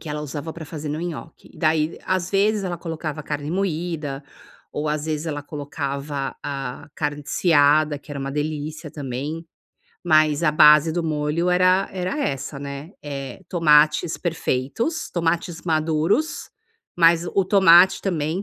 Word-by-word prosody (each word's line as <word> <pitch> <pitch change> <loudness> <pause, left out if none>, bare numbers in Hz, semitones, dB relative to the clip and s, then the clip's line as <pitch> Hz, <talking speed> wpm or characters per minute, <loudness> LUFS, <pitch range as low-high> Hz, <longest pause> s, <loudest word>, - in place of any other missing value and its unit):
Que 160 - -9
ela 150 0 -3
usava 150 +2 -5
para 165 -1 -8
fazer 150 -1 -7
no 150 +2 -3
nhoque, 165 -1 -7
daí 155 -1 +1
às 185 -1 -1
vezes 205 +1 +2
ela 175 -2 -3
colocava 155 -3 -5
carne 145 0 -4
moída, 165 -6 -2 0.5
ou 150 +1 -2
às 150 0 -1
vezes 155 +1 -2
ela 145 -2 -3
colocava 140 -1 -4
a 135 -2 -5
carne 145 -1 -3
desfiada 150 -2 +3
que 145 - -17
era 145 - -5
uma 135 0 -4
delícia 150 +1 -4
também, 145 +4 -5 0.6
mas 155 -2 +3
a 155 - +4
base 150 +1 +6
do 175 +1 -1
molho 155 +3 0
era 185 +1 +3
era 185 +9 -3
essa, 140 - -3
né, 140 +3 -7
eh 140 +2 -6
tomates 150 -1 +3
perfeitos, 170 - -2
tomates 170 0 -1
maduros, 160 - 0 0.5
mas 170 0 +4
o 195 +2 +1
tomate 185 -1 +6
também 170 -1 -1
155 Hz, 145 wpm, -22 LUFS, 145-170 Hz, 0.6 s, base